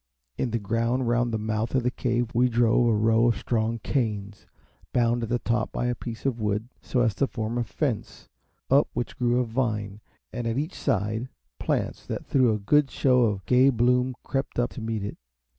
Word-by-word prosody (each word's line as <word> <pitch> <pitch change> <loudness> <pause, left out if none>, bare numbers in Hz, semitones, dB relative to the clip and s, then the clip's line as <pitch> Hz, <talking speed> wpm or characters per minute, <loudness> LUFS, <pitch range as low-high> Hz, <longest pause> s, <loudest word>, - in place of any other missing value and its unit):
In 130 - -1
the 115 - 0
ground 115 +4 0
round 120 0 +1
the 110 - 0
mouth 110 +3 -2
of 130 - +2
the 125 - +1
Cave 120 -2 -1
we 125 +2 +3
drove 120 0 +3
a 115 - +3
row 110 +2 +3
of 120 - +2
strong 115 -1 -1
canes, 105 -5 -3 0.4
bound 120 -1 +2
at 115 - -3
the 120 - +2
top 115 -1 -1
to 125 0 0
a - - 0
piece 115 0 -7
of 120 -4 -1
wood, 105 +2 -1
so 125 - 0
as 115 -3 +2
to 135 +7 +1
form 115 0 -3
a - - +1
fence, 120 +1 -3 0.4
up 140 +2 +5
which 120 0 -3
grew 120 0 +1
a 125 - +1
vine, 110 -4 -2 0.3
and, 120 -1 -3
at 115 +1 -1
each 155 +6 -2
side, 110 +4 -1 0.3
plants - - -1
that - - -4
threw 130 -4 +3
a 105 - +1
good 140 +8 +3
show 125 -2 +3
of 100 -3 -2
gay 130 +2 +5
bloom 125 +1 +2
crept 135 0 -3
up 120 0 +1
to 125 - -8
meet 110 -2 -2
it. 100 - -6
120 Hz, 210 wpm, -26 LUFS, 110-125 Hz, 0.4 s, up